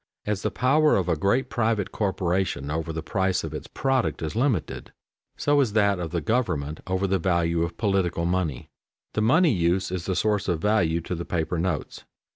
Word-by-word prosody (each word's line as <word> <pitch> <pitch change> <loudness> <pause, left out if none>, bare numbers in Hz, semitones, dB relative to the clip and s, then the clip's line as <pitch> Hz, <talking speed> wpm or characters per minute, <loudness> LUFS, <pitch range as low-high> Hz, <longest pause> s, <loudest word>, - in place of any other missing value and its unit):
As 105 -1 -1
the - - 0
power 150 +5 +3
of 95 -3 0
a 85 - +2
great 100 - +1
private 110 -5 0
corporation 95 -6 -1
over 80 +1 -2
the 80 0 -5
price 95 -1 0
of - - -5
its - - -6
product 135 -9 -1
is 80 - -4
limited, 115 - -1 0.5
so 145 0 +3
is 115 -7 0
that 100 -3 +3
of 85 -2 -3
the 85 0 -2
government 85 - -1
over 95 +1 0
the 95 0 +1
value 85 -1 +1
of 85 0 -2
political 95 -5 0
money. 85 -7 -1 0.5
The 110 - 0
money 155 +10 +4
use 90 0 +1
is 90 -2 -3
the 95 - 0
source 105 0 +1
of 85 -4 0
value 85 -4 +2
to 85 - -5
the 85 0 -3
paper 85 0 -2
notes. 85 -4 -3
95 Hz, 195 wpm, -25 LUFS, 85-110 Hz, 0.5 s, money